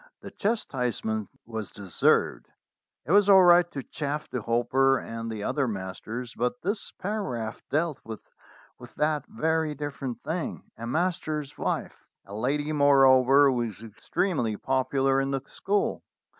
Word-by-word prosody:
The - - -9
chastisement 125 - -2 0.2
was 110 -2 -5
deserved. 100 -4 +1 0.6
It - - -3
was 205 +1 +5
all 190 -2 +8
right 175 0 +6
to 140 -5 -6
chaff 150 +2 -4
the 125 - -4
Hopper 130 +4 +2
and 115 -1 -6
the 105 -2 -5
other 140 +2 0
masters, 110 +4 -5
but 125 +1 -1
this 200 +3 -2
paragraph 130 - -4
dealt 155 +1 0
with 110 -1 -8 0.7
that 150 -2 0
very 160 +3 0
different 140 -4 -5
thing, 165 +1 -3
a 115 - -7
master's 155 -1 -1
wife - - -3 0.2
a 100 - -11
lady, 145 +7 -1
moreover, 135 -1 +6
who 125 - -1
was 115 -3 -3
extremely 115 - -2
popular 135 +1 +1
in 135 - -1
the 135 -1 -1
school. 200 +5 -1
135 Hz, 140 wpm, -27 LUFS, 115-155 Hz, 0.7 s, all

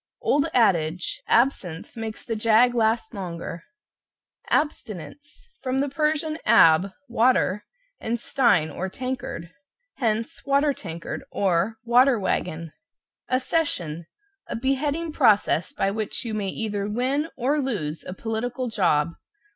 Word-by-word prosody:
(Old 290 +2 +2
adage, 175 - +1
"Absinthe 200 -10 +1
makes 225 -1 -6
the 225 - -2
jag 230 +3 +4
last 225 0 +1
longer)." 170 -3 -6 0.9
=ABSTINENCE= 285 - -3
From 260 -1 -1
the 280 +1 +1
Persian 310 +2 0
ab, 180 -4 +6 0.2
water, 235 -4 +2 0.3
and 230 +1 -2
stein, 215 - +2
or 190 +6 -4
tankard. 255 -7 -5 0.5
Hence, 225 -2 -1
water 280 +1 +2
tankard, 165 -8 -6
or 195 +3 +1
"water 245 +1 +4
wagon." 165 -4 -2 0.6
=ACCESSION= 255 - -1 0.4
A - - -4
beheading 285 +6 -1
process 210 - +3
by 195 - 0
which 215 +3 -3
you 225 - -3
may 205 -2 -1
either 205 -1 -3
win 265 +8 0
or 270 +4 +1
lose 185 - -2
a 180 - -7
political 245 +4 -3
job. 170 -7 +2
225 Hz, 120 wpm, -25 LUFS, 185-260 Hz, 0.9 s, ab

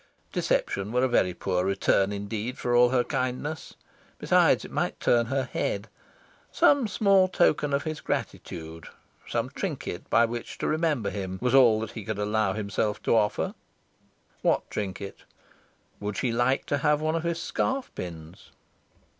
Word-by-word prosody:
Deception 100 +2 0
were 125 +2 +2
a - - +4
very 95 -7 +2
poor 90 0 -1
return 95 +1 +2
indeed 105 +4 -4
for 120 0 0
all 120 0 +6
her 125 -1 +2
kindness. 130 +6 -3 0.4
Besides, - - +3
it - - -10
might - - -2
turn 120 -1 +3
her 135 +2 0
head. 105 -4 -3 0.6
Some 280 -5 +4
small 195 -1 +4
token 150 -5 +2
of 140 0 +1
his 155 -2 -4
gratitude 80 0 -5 0.4
some - - -2
trinket - - -5
by 115 - +5
which 120 0 -6
to - - -2
remember 155 -10 0
him 95 -2 -4
was 125 0 0
all 120 -5 +6
that 110 - -5
he 110 - -7
could 110 +1 -4
allow 105 +1 +1
himself 105 0 -2
to - - +3
offer... 105 -2 +1 0.9
What - - +1
trinket? 100 -1 -5 0.8
Would 105 0 -4
she 125 - 0
like 120 +3 +1
to 145 - 0
have 150 +1 +2
one 155 +1 0
of 165 - 0
his 170 0 -2
scarf 265 +8 -2
pins? 80 -2 -8
120 Hz, 160 wpm, -27 LUFS, 100-145 Hz, 0.9 s, all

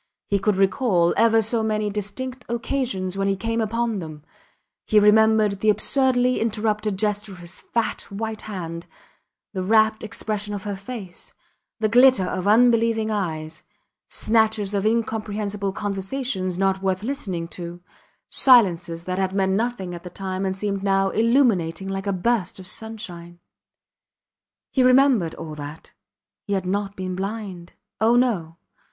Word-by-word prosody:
He 200 - +2
could 205 +1 +1
recall 190 -3 +2
ever 225 -1 +4
so 225 +2 +2
many 215 -1 -1
distinct 245 +6 -5
occasions 235 -6 -2
when 195 - +1
he 195 - +1
came 230 +3 -2
upon 230 0 -1
them; 155 -3 -8 0.6
he 215 - +5
remembered 210 -1 +4
the 215 - +2
absurdly 255 +2 +3
interrupted 215 -2 -1
gesture 205 0 -1
of - - -11
his 175 +1 -9
fat, 230 -2 -2
white 220 +2 -4
hand, 170 -5 -6 0.7
the 190 - -2
rapt 220 +2 +3
expression 210 -1 -3
of 195 - -6
her 205 -1 -3
face, 195 -2 -9 0.5
the 220 - +2
glitter 245 -2 +5
of 185 +1 -3
unbelieving 230 0 +3
eyes; 160 -6 -3 0.5
snatches 220 -2 +1
of 200 +1 +1
incomprehensible 210 -3 -1
conversations 195 -1 -3
not 190 0 +1
worth 190 0 -1
listening 195 -10 -3
to, 175 0 -7 0.5
silences 175 -10 +4
that 185 +1 -3
had 190 0 -1
meant 190 -1 +2
nothing 200 -3 -1
at 170 - -7
the 180 - -7
time 190 +1 -4
and 190 - -2
seemed 200 0 -2
now 195 -1 +2
illuminating 215 -7 +2
like 195 +1 -4
a - - +2
burst 195 0 0
of 190 - -9
sunshine. 180 -5 -8 1.3
He 265 - +2
remembered 255 - +4
all 155 -1 -7
that. 150 +1 -9 0.5
He 200 - -1
had 190 -2 -1
not 200 +1 -2
been 185 -1 -4
blind. 190 -2 -5 0.3
Oh! 225 +2 +4
No! 195 -10 +1
205 Hz, 145 wpm, -23 LUFS, 185-225 Hz, 1.3 s, he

